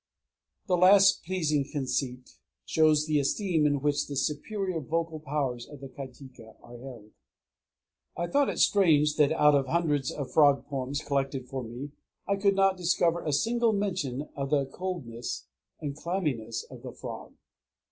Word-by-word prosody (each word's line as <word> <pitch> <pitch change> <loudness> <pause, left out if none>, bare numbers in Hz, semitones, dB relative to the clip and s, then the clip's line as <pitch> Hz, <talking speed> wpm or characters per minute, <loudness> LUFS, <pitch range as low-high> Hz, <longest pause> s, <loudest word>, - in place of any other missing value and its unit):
_ - - -41
The 180 -2 +2
last 195 +2 +6
pleasing 160 -5 0
conceit 130 -3 -3 0.3
shows 155 -1 +3
the 155 -1 +2
esteem 160 +2 +1
in 145 -2 0
which 145 0 0
the 145 - -5
superior 185 +6 -2
vocal 160 +2 -2
powers 135 -5 -3
of 145 - -11
the 135 0 -9
kajika 130 -4 -11
are 120 0 -12
held. 125 -4 -10
III 105 - -21 1.1
I 170 - -1
thought 280 +4 +2
it - - -4
strange 150 -7 +4
that 150 -2 +4
out 150 -2 +4
of 140 -2 +2
hundreds 150 -3 0
of 140 -3 -5
frog 145 -3 +4
poems 140 +1 -3
collected 135 -2 -2
for 130 +1 -4
me 125 +5 -7 0.4
I 200 - +2
could 200 0 +2
not 195 -1 +3
discover 175 -1 +1
a 150 - -1
single 230 - +2
mention 180 -10 -2
of 140 -1 -3
the 140 -2 +2
coldness 135 -9 -5 0.3
and 145 -2 -4
clamminess 150 - -3
of - - -10
the - - -8
frog. - - -8
150 Hz, 165 wpm, -28 LUFS, 135-175 Hz, 1.1 s, last